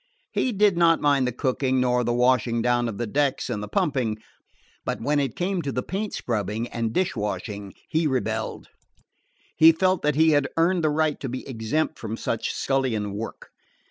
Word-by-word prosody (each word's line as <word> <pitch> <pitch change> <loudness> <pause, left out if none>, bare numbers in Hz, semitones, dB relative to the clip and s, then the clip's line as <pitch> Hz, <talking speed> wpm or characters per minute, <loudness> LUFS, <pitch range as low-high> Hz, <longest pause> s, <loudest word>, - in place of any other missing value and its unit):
He 255 - 0
did 205 -3 +3
not 165 -1 +5
mind 140 -3 +2
the - - 0
cooking, 130 +1 0
nor 125 -1 +2
the 120 - 0
washing 120 -1 +2
down 120 -1 +2
of 105 - -6
the 120 - -2
decks 135 +2 0
and 105 -3 -2
the 105 - -5
pumping; 120 -2 0 0.7
but - - -3
when 145 +5 +1
it 135 -4 -1
came 185 0 -1
to 140 -3 -3
the 125 -1 -2
paint 200 +3 -3
scrubbing 110 0 -2
and 115 -1 -2
dishwashing 105 - -2
he 160 0 +1
rebelled. 110 -5 -2 0.9
He 160 +1 +8
felt 185 +2 +1
that 150 -1 +1
he 160 +1 +5
had 145 -2 +2
earned 170 +1 +2
the 155 - +3
right 155 0 +1
to 135 - -4
be 130 +1 -6
exempt 130 +6 -2
from 110 0 -5
such 115 - -2
scullion 120 -7 -1
work. 110 +3 -7
130 Hz, 185 wpm, -25 LUFS, 115-155 Hz, 0.9 s, He